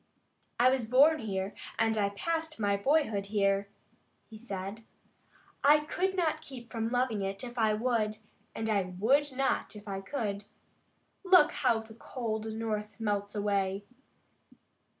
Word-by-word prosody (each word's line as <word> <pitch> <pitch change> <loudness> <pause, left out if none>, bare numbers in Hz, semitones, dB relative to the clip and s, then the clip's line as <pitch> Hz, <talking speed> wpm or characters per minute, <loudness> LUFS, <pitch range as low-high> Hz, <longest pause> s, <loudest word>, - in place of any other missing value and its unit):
"I 250 +2 +6
was 260 -4 0
born 295 +6 +6
here, 195 -3 -3 0.2
and 225 0 +2
I 205 -2 +1
passed 320 +8 -3
my 205 -1 +2
boyhood 220 -3 +1
here," 200 -1 +1 0.6
he 220 - -13
said. 205 -1 -6 0.8
"I 295 +2 +6
could 375 +5 -1
not 320 -4 0
keep 250 -6 -11
from 225 -1 -2
loving 245 -4 0
it 195 +2 -3
if 240 -1 -7
I 215 -1 +3
would, 215 -2 0 0.4
and 220 - -2
I 210 -2 +2 0.2
would 275 +8 +3
not 265 -3 -1
if 210 0 -11
I 195 -1 -4
could. 205 -3 -3 0.8
Look 365 -5 +6
how 235 -4 +1
the 220 0 -13
cold 220 -2 -4
North 215 -1 -4
melts 205 -1 -1
away. 200 -1 0
220 Hz, 145 wpm, -30 LUFS, 205-260 Hz, 0.8 s, I